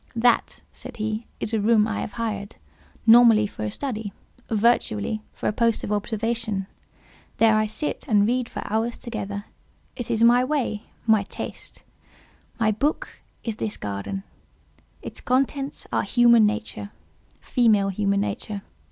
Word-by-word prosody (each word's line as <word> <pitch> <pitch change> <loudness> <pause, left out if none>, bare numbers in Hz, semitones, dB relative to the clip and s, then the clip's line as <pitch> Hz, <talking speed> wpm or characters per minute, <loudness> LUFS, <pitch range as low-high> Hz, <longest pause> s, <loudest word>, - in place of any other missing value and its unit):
"That," 235 0 +2
said - - -9
he, 215 +1 -3
"is 220 - -3
a 220 - +2
room 215 0 +4
I 220 - -2
have - - -5
hired, 210 -3 -4 0.5
nominally 230 -2 +7
for 200 - -6
a - - -1
study—virtually 220 - -1
for - - -4
a - - +1
post 230 0 +1
of - - -3
observation. 220 -1 -1 0.7
There 225 -1 +5
I 215 0 +2
sit 295 +8 -2
and 205 -5 +4
read 245 +2 0
for - - -5
hours 225 +3 -1
together: 205 -3 -5 0.5
it 245 -3 -6
is 230 -1 +2
my 240 +2 +6
way—my 230 -5 0
taste. - - -7 0.8
My 220 -1 +3
book 285 +9 -2 0.2
is 225 -2 -3
this 215 -2 -3
garden; 105 - -4 0.8
its - - -7
contents 275 +2 0
are - - +3
human 235 -3 +5
nature—female 215 0 -1
human 200 0 +1
nature. 205 0 -3
220 Hz, 135 wpm, -24 LUFS, 205-235 Hz, 0.8 s, nominally